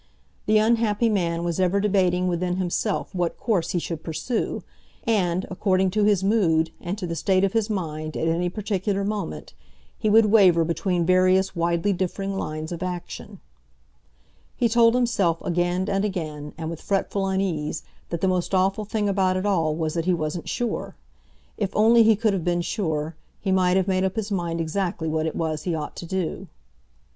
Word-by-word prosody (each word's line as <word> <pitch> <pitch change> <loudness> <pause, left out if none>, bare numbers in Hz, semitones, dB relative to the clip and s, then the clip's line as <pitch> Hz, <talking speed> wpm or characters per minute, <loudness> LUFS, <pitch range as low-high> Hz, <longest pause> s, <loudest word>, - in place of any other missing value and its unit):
The 215 - +5
unhappy 225 0 +2
man 170 -5 0
was 175 0 -2
ever 185 +2 +2
debating 185 -3 +2
within 180 0 -1
himself 185 +3 -2
what 175 -2 -1
course 200 -8 0
he - - -1
should 165 -2 -4
pursue, 195 +10 -3 0.4
and, 185 -5 +1
according 185 0 +1
to 210 +1 +2
his 205 -3 +3
mood 165 -6 +2
and 175 +4 -4
to 200 - -4
the 170 -1 -3
state 185 +4 +2
of 195 - +1
his 225 -1 +1
mind 155 -6 -3
at 160 - -1
any 170 +2 +1
particular 200 0 -2
moment, 210 0 -4 0.5
he 215 - +1
would 220 +1 +6
waver 185 -6 +6
between 175 +1 0
various 185 +1 +3
widely 170 +3 +1
differing 195 +2 -2
lines 155 -3 -4
of 175 0 -5
action. 180 -1 -6 1.2
He 240 - +3
told 230 +1 +4
himself 205 -9 +1
again 175 +2 0
and 195 -1 0
again, 155 -7 -4
and 160 0 -4
with 165 - -7
fretful 195 0 -1
unease, 185 -6 -1 0.3
that 170 -1 -3
the 190 - +2
most 185 +1 0
awful 195 +3 +1
thing 210 0 -1
about 190 -2 +1
it 185 - -2
all 165 -6 +1
was 160 -1 -2
that 165 -1 -2
he 180 -1 +3
wasn't 155 +1 -4
sure. 240 -1 -3 0.6
If 200 -3 -1
only 230 +2 +6
he 225 -1 +6
could 215 0 +1
have 185 -4 -2
been 175 0 +1
sure, 160 -5 -2 0.2
he 195 - -2
might 185 -1 +3
have 190 - +1
made 185 -1 +1
up 190 0 -1
his 215 -1 -3
mind 170 -3 -1
exactly 165 0 -2
what 155 0 0
it 160 - -4
was 155 -2 -2
he 170 +1 -2
ought 150 -2 -5
to 170 - -7
do. 190 +1 -3
185 Hz, 185 wpm, -24 LUFS, 170-200 Hz, 1.2 s, would